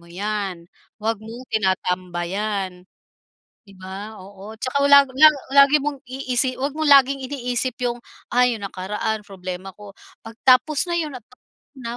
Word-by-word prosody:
mo 170 Hz, -, -19 dB
yan, 195 Hz, -2 st, -4 dB, 0.3 s
wag 220 Hz, 0 st, -2 dB
mong 230 Hz, +4 st, -10 dB
tinatambayan." 185 Hz, 0 st, -2 dB, 0.8 s
'Di 195 Hz, -, -15 dB
ba? 195 Hz, +3 st, -8 dB
Oo. 200 Hz, +3 st, -11 dB
Tsaka 260 Hz, +4 st, -1 dB
wala 280 Hz, 0 st, +8 dB
la 310 Hz, +2 st, +9 dB, 0.3 s
lagi 280 Hz, +1 st, +7 dB
mong 290 Hz, -2 st, -3 dB
iisi 255 Hz, -1 st, -1 dB
huwag 275 Hz, +2 st, -2 dB
mong 315 Hz, -1 st, 0 dB
laging 275 Hz, 0 st, +6 dB
iniisip 250 Hz, -2 st, -3 dB
'yong, 240 Hz, -1 st, -2 dB, 0.3 s
"Ah, 250 Hz, +1 st, +4 dB
'yong 220 Hz, -4 st, -3 dB
nakaraan 210 Hz, +3 st, -3 dB
problema 185 Hz, 0 st, -7 dB
ko." 205 Hz, -1 st, -12 dB, 0.3 s
'Pag 225 Hz, 0 st, -10 dB
tapos 285 Hz, +6 st, +4 dB
na 345 Hz, -, -1 dB
'yon 305 Hz, -3 st, -3 dB
at 235 Hz, -, -13 dB, 0.5 s
na 240 Hz, -2 st, -6 dB
220 Hz, 150 wpm, -22 LUFS, 195-260 Hz, 0.8 s, la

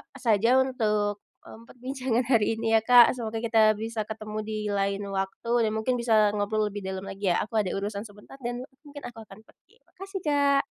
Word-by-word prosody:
saja 235 Hz, +3 st, +3 dB
untuk, 210 Hz, -5 st, -1 dB, 0.2 s
mmm, 230 Hz, +1 st, -14 dB
perbincangan 255 Hz, -1 st, -2 dB
hari 225 Hz, -1 st, +3 dB
ini 225 Hz, 0 st, -2 dB
ya, -, -, -10 dB
Kak, 245 Hz, 0 st, +8 dB
semoga 225 Hz, -1 st, -3 dB
kita 220 Hz, -2 st, +4 dB
bisa 220 Hz, 0 st, -4 dB
ketemu 215 Hz, -1 st, -6 dB
di 215 Hz, -1 st, -3 dB
lain 200 Hz, 0 st, -1 dB
waktu 195 Hz, +4 st, -3 dB, 0.2 s
dan -, -, -1 dB
mungkin 235 Hz, +3 st, 0 dB
bisa 220 Hz, -3 st, +3 dB
ngobrol 210 Hz, +1 st, 0 dB
lebih 205 Hz, -, -5 dB
dalam 190 Hz, 0 st, -4 dB
lagi 195 Hz, 0 st, -5 dB
ya, -, -, +1 dB
aku 220 Hz, +1 st, -1 dB
ada 195 Hz, -3 st, -1 dB
urusan 200 Hz, +2 st, -4 dB
sebentar 205 Hz, +6 st, -15 dB
dan 245 Hz, 0 st, -4 dB, 0.2 s
mungkin 285 Hz, 0 st, -10 dB
aku 240 Hz, -, -9 dB
akan 195 Hz, -, -14 dB
pergi. 435 Hz, -, -27 dB, 0.2 s
Makasih, 390 Hz, 0 st, -7 dB
Kak. 285 Hz, -2 st, +3 dB
220 Hz, 190 wpm, -26 LUFS, 205-245 Hz, 0.2 s, Kak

